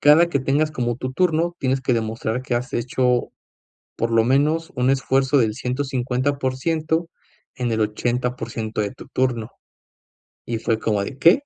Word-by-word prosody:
cada 155 +4 +6
que 140 - +1
tengas 145 +4 +1
como 120 -5 -1
tu 130 +1 -4
turno, 170 +2 +1
tienes 130 0 0
que 130 0 0
demostrar 115 +1 -2
que 130 - -2
has 125 +2 -2
hecho, 125 0 +1 0.7
por 115 0 -1
lo 115 0 +5
menos, 150 +6 +2
un 125 +1 +3
esfuerzo 135 +1 +2
del 110 -4 +2
150% 135 +5 -1 0.5
en 120 -2 -1
el 110 - 0
80% 115 0 -2
de 105 -1 -1
tu - - -13
turno. 120 -4 -1 1.0
Y 115 - -2
fue 115 0 0
como 105 -3 0
de: 135 - -7
“¿Qué?” 170 - +6
130 Hz, 155 wpm, -22 LUFS, 120-145 Hz, 1.0 s, cada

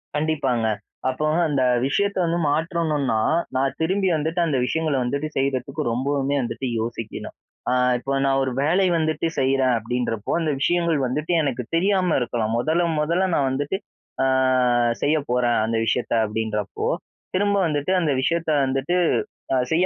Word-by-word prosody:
கண்டிப்பாங்க. 145 -7 0 0.4
அப்போ 130 +4 -2 0.2
அந்த 140 -4 +1 0.2
விஷயத்த 200 +7 0
வந்து 170 +1 0
மாற்றணுன்னா, 155 - 0 0.4
நான் 135 +1 0
திரும்பி 190 +4 +1
வந்துட்டு 160 +4 -2
அந்த 145 -5 0
விஷயங்கள 155 +1 0
வந்துட்டு 140 +5 -2
செய்றதுக்கு 135 +2 -1
ரொம்பவுமே 140 +2 0
வந்துட்டு 130 +2 -4
யோசிக்கணும். 115 -1 -5 0.4
ஆ - - +2 0.3
இப்ப 135 +2 -2
நான் 135 0 +2
ஒரு 130 - -1
வேலை 180 +6 +3
வந்துட்டு 155 +1 0
செய்றேன் 130 -1 +2
அப்பிடின்றப்போ, 115 -1 -3
அந்த 155 -2 0
விஷயங்கள் 170 -1 +2
வந்துட்டு 150 +6 -2
எனக்கு 130 -4 -2
தெரியாம 185 -1 +2
இருக்கலாம் 115 -2 -1
மொதல, 160 +7 +1 0.2
மொதல 170 +5 +1
நான் 135 -2 +2
வந்துட்டு, 145 +7 -1 0.5
ஆ - - +3 0.8
செய்ய 155 +2 +2
போறேன். 120 -1 +2
அந்த 115 0 -1
விஷயத்த 120 0 0
அப்பிடின்றப்போ, 105 -1 -3 0.5
திரும்ப 200 +1 +2
வந்துட்டு 145 +2 -1
அந்த 155 - +1
விஷயத்த 165 +4 0 0.2
வந்துட்டு 135 +6 -1 0.6
அ - - +3 0.2
செய்ய 175 +3 +3
140 Hz, 140 wpm, -23 LUFS, 125-160 Hz, 0.8 s, வேலை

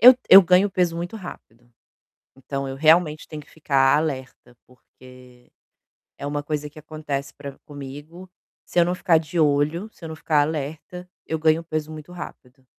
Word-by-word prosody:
Eu 250 +3 +10
eu 195 0 +11
ganho 185 +3 +4
peso 175 -3 0
muito 175 +6 -5
rápido. 120 - -12 0.7
Então 135 +1 -5
eu 135 - -6
realmente 155 +1 +3
tenho 150 -1 -8
que - - -21
ficar 135 -3 +2
alerta, 130 -5 -4
porque 125 0 -19 0.7
é - - -7
uma 145 0 -3
coisa 150 0 -3
que 150 - -14
acontece 150 -3 -5
pra 140 -1 -9
comigo, 145 +6 -10 0.4
se - - 0
eu 170 - +5
não 180 - 0
ficar 170 -3 +3
de 160 +2 -3
olho, 150 +6 +1
se - - -21
eu 160 - -6
não 160 - -6
ficar 155 -1 +1
alerta, 160 +4 -5 0.2
eu 160 - -3
ganho 160 +1 +2
peso 155 -1 -4
muito 155 +2 -10
rápido. 135 -7 -11
155 Hz, 175 wpm, -23 LUFS, 140-170 Hz, 0.7 s, eu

